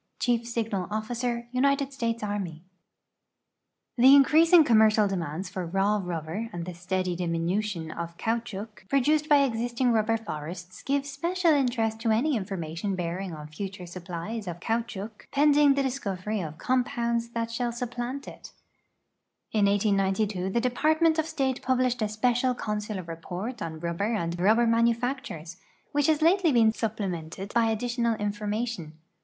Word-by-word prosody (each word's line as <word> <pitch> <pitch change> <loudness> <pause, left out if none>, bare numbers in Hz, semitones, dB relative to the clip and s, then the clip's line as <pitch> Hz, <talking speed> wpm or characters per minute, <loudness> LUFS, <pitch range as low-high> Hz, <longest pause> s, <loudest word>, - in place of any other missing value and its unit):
Chief 240 -2 +2
SiyiKil 225 -6 -3
()(}ic(r, 215 +1 -2 0.5
Ciiilrd 250 - +1 0.3
Slatrx 230 -4 -2
Anni/ 190 -6 -4 1.4
The 250 - +7
incre; 285 +3 +6
vsin<f 335 -1 +7
coiumercial 215 -3 +5
dt'inands 180 -2 -3
for 190 -1 -5
r;;\v 170 0 -6
nil)l)or 195 0 -1
and 170 -1 -5
tlie 180 -1 -7
steady 180 +1 -2
diminution 170 0 -2
of 170 0 -6
eaoutehouc 220 -3 -4
produced 300 +3 +2
l)y 285 -2 +6
existinir 240 +1 0
i 220 - +4
uhlicr 225 +1 -1
forests 170 +3 -7
give 280 0 0
special 335 +5 +1
interest 240 -6 +1
to 225 0 -1
any 255 +7 +2
information 190 -2 -3
bearing' 180 0 -3
on 150 -1 -8
future 185 +4 -6
supplies 180 +4 -6
of 175 -1 -5
caoutchouc 225 0 -4
pending 290 0 +5
the 280 - +1
discovery 210 -6 -2
of 155 -2 -6
comj)ounds 235 -1 0
tliat 230 0 -3
shall 240 +1 -1
supi)lantit. 245 +3 -6 1.0
In 210 -2 +3
liSD'i 200 -1 +1
the 235 - +1
Department 315 +6 +2
of 315 - 0
State 270 -5 -1
puhlished 255 -1 +1
a - - +3
Spt'cial 245 +4 +1
Consular 210 -3 -3
Rei»ort 175 +8 -6
on 160 -1 -5
ruliher 175 +7 -1
and 170 -2 -2
ruhlicr 215 +7 +3
manufactures, 230 - 0 0.3
which 290 0 +2
has 310 -1 +2
lately 345 0 +4
been 230 -4 +5
su])plemented 195 -4 -4
hy 230 -1 +3
additional 235 +1 0
information. 210 -4 -3
220 Hz, 145 wpm, -27 LUFS, 185-245 Hz, 1.4 s, The